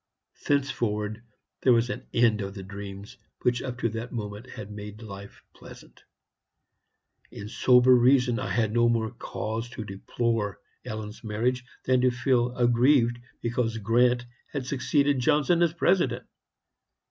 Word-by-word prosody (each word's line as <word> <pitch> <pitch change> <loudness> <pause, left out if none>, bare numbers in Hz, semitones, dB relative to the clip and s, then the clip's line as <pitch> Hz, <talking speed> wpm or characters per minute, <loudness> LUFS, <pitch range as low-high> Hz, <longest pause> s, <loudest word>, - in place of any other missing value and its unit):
"Thenceforward 115 -6 -1 0.4
there 130 - +5
was 115 +1 +2
an - - -7
end 115 -3 +3
of 100 +1 -5
the 95 - -7
dreams 100 +4 -9 0.3
which 125 -1 +2
up 125 -2 -5
to 115 - 0
that 115 +2 -5
moment 105 +1 -6
had 105 -1 -8
made 105 +1 -8
life 100 -2 -10
pleasant. - - -14 1.3
In 105 - -8
sober 125 +2 +5
reason 125 -1 +4
I 130 - -3
had 110 -3 0
no 120 0 +4
more 115 -2 0
cause 115 -1 -5
to 120 -2 -6
deplore 105 +1 -2 0.2
Ellen's 110 0 -7
marriage 120 +4 -1 0.2
than 130 -1 +3
to 125 - +4
feel 125 0 +1
aggrieved 120 0 +3 0.2
because 115 -1 -1
Grant 120 +3 +2 0.3
had 135 -3 -3
succeeded 140 +1 +1
Johnson 150 +5 +3
as 170 -2 +4
President. 175 +2 +1
120 Hz, 140 wpm, -27 LUFS, 110-125 Hz, 1.3 s, there